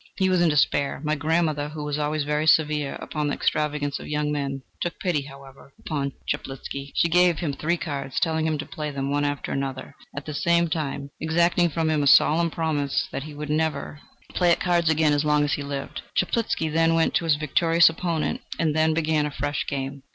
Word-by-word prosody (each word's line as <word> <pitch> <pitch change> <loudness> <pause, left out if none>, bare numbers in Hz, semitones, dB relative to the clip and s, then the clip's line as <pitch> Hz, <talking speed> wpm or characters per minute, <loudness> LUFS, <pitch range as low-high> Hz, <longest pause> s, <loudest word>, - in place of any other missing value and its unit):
He 190 -1 +2
was 185 -2 +3
in 175 - +4
despair. 140 -1 +1
My 150 0 0
grandmother, 155 -1 0
who 150 0 -6
was 150 0 -2
always 150 0 -1
very 150 +2 -1
severe 150 -3 +3
upon 150 -2 -3
the 145 - -1
extravagance 145 -2 -1
of - - -9
young 150 0 -1
men, 140 -2 -3 0.2
took 175 - -2
pity, 175 -6 0
however, 135 0 -13
upon 140 -3 -3
Chaplitzky. 135 +1 -5
She - - +3
gave 175 0 +4
him 155 -5 -2
three 165 +5 -1
cards, 140 -5 -4
telling 160 -2 +1
him 155 -1 0
to 150 - -5
play 155 -5 -5
them 140 -1 -3
one 145 0 +1
after 145 0 -2
the 135 - 0
other, 135 -1 -6 0.2
at 140 - -5
the 150 - -5
same 170 +2 +2
time 140 -3 -3
exacting 170 +2 +2
from 160 0 0
him 155 -1 +1
a 140 - +1
solemn 165 +5 +5
promise 155 -4 -1
that - - -4
he 155 -1 -9
would 150 0 -5
never 150 -2 -1 0.3
play 175 -1 +2
at - - +3
cards 170 -2 +2
again 155 -1 +3
as 145 0 +1
long 150 -1 +3
as 145 - 0
he - - -1
lived. 140 -1 -5
Chaplitzky 225 -8 0
then 165 +1 +2
went 165 0 +2
to 170 - +1
his 160 -2 +4
victorious 165 +3 +4
opponent, 165 -1 -1 0.2
and 155 -2 0
they 160 0 +3
began 155 -1 +1
a - - -3
fresh 145 +1 -3
game. 135 0 -4
150 Hz, 215 wpm, -24 LUFS, 145-160 Hz, 0.3 s, solemn